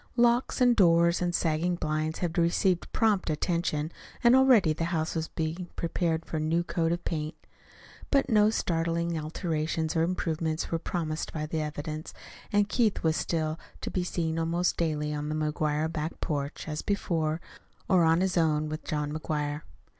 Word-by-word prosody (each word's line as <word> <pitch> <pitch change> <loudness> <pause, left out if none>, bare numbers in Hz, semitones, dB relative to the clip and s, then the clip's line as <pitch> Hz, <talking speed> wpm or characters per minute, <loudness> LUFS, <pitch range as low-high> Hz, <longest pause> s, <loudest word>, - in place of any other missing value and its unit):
Locks 240 +1 +3
and 245 -1 +5
doors 170 -3 +4
and 175 -1 0
sagging 165 +3 +1
blinds 155 -1 -1
had 170 -1 -3
received 175 +1 +1
prompt 215 -7 +2
attention, 155 -1 -1 0.3
and 240 +1 +7
already 250 -11 +5
the 165 +2 -2
house 160 -2 -1
was 160 -1 -2
being 165 +3 -4
prepared 165 -1 -1
for 160 - -4
a - - 0
new 160 +3 +1
coat 165 -1 0
of 175 0 -2
paint; 155 -1 -2 0.7
but 275 -1 +3
no 210 -2 +5
startling 170 -3 0
alterations 160 0 -2
or 160 - +3
improvements 165 -2 -1
were 165 - 0
promised 160 -2 -3
by 155 -1 -3
the 155 +1 -2
evidence, 155 +1 -5 0.4
and 205 0 +3
Keith 220 -1 +1
was 160 -1 +2
still 155 0 -1 0.2
to - - -4
be 180 - 0
seen 165 -2 -1
almost 170 +2 +1
daily 150 -2 -1
on 150 0 -3
the 155 - -2
McGuire 155 +1 0
back 155 0 -3
porch, 145 0 -3
as 150 -1 -3
before, 165 -6 -1 0.5
or 180 -2 +4
on 165 +2 +4
his 185 -1 +1
own, 155 -2 +2
with 155 +1 -5
John 150 -1 -2
McGuire. 150 -1 -2
165 Hz, 170 wpm, -28 LUFS, 155-175 Hz, 0.7 s, and